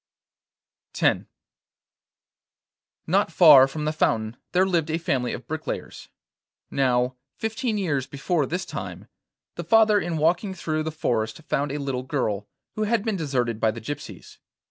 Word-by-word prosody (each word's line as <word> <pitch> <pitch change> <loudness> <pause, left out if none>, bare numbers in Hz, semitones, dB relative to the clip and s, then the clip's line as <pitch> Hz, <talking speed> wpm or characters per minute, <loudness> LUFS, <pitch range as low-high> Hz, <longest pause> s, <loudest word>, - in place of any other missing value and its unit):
X - - +2 1.8
Not - - +2
far 145 -7 +8
from 150 +2 -5
the 155 - 0
fountain 110 -6 0 0.2
there 185 +1 +3
lived 170 -4 0
a 160 - 0
family 130 -7 -1
of 125 - -6
bricklayers. 155 0 -6 0.6
Now, 125 -1 +1 0.2
fifteen 225 0 -2
years 145 -9 -1
before 145 +1 -1
this 180 +3 -3
time, - - -7 0.5
the - - -3
father 220 -2 +5
in 170 -4 -2
walking 175 +5 +1
through 155 -3 -2
the 160 0 -3
forest 115 -3 -2
found 145 -1 -1
a 145 - -2
little 135 -3 -2
girl, 110 -7 -2 0.3
who 215 - -1
had 225 0 0
been 220 -3 0
deserted 125 - -1
by 110 - +3
the 110 +1 -4
gypsies. 145 +6 -8
150 Hz, 145 wpm, -25 LUFS, 130-180 Hz, 1.8 s, far